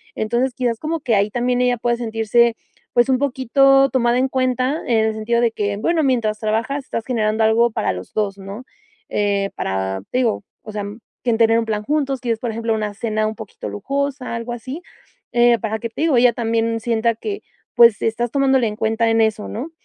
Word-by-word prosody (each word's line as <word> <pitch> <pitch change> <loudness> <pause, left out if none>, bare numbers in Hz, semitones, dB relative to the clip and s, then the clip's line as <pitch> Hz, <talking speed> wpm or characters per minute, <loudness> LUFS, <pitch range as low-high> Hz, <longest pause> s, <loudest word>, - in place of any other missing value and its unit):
entonces 240 +4 0
quizás 240 -3 -1
como 320 +1 -3
que 235 -5 +1
ahí 200 +1 +2
también 245 +1 0
ella 250 0 +3
puede 235 0 0
sentirse, 225 0 +2 0.4
pues 240 +2 +3
un 260 - +4
poquito 275 0 +3
tomada 240 -1 +2
en 265 - +1
cuenta, 255 +3 0
en 230 -2 +3
el 220 - 0
sentido 235 +2 0
de 235 -1 +2
que 205 -2 -2
bueno, 325 +10 +1
mientras 230 -6 +1
trabajas 230 +6 -1
estás 230 - -4
generando 220 -3 0
algo 230 +1 +3
para - - -1
los 90 0 -9
2, 200 -2 -1
¿no?, 195 +5 -8 0.5
eh, 200 -1 0
para 95 0 -2
te 255 - +1
digo, 230 -5 0 0.2
o 215 - -8
sea, 205 -1 -4 0.4
quieren 235 -3 +1
tener 225 0 +4
un - - 0
plan 210 -1 -2
juntos, 275 -1 -1
quieres, 230 -2 -2
por 235 -1 -3
ejemplo, 225 0 -1
una 215 -1 -2
cena 215 0 -1
un 215 - -4
poquito 215 - -8
lujosa, 275 - -3
algo 230 +1 -5
así, 260 +7 -7 0.5
eh, 240 -1 +4
para 220 0 -3
que, 230 - -3
te 225 - -7
digo, 315 -5 +3
ella 240 -1 +5
también 230 -1 0
sienta 230 0 +1
que 405 - -5 0.3
pues 235 -3 +6
estás 235 +2 0
tomándola 265 -3 +2
en 210 - -4
cuenta 225 +1 +1
en 225 0 +3
eso, 215 -1 0
¿no?, 275 +9 -5
230 Hz, 205 wpm, -20 LUFS, 220-255 Hz, 0.5 s, pues